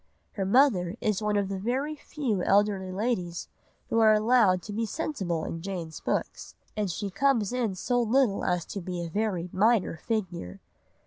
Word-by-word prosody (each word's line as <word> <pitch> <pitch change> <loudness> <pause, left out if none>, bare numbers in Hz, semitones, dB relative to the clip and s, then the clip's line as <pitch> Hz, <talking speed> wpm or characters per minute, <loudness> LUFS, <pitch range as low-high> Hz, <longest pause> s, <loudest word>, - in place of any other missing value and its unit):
Her 195 -3 -3
mother 200 -6 +3
is 215 -1 0
one 210 -1 +1
of 200 -1 +1
the 195 0 -4
very 265 +9 -1
few 260 -10 -2
elderly 195 -1 +2
ladies 185 -4 -2 0.4
who 230 - +3
are 215 -1 +6
allowed 215 -5 +4
to 210 - -7
be 225 +2 -1
sensible 195 - -2
in 165 - -5
Jane's 170 -4 -5
books, - - -3 0.2
and 210 -2 -1
she 195 +4 -3
comes 235 -1 +2
in 235 -6 -1
so 245 +6 0
little 235 -2 +2
as 180 -2 0
to 200 - -4
be 175 0 -4
a 170 - -5
very 190 -2 -1
minor 210 -3 +2
figure. 180 - -3
205 Hz, 175 wpm, -28 LUFS, 185-230 Hz, 0.4 s, are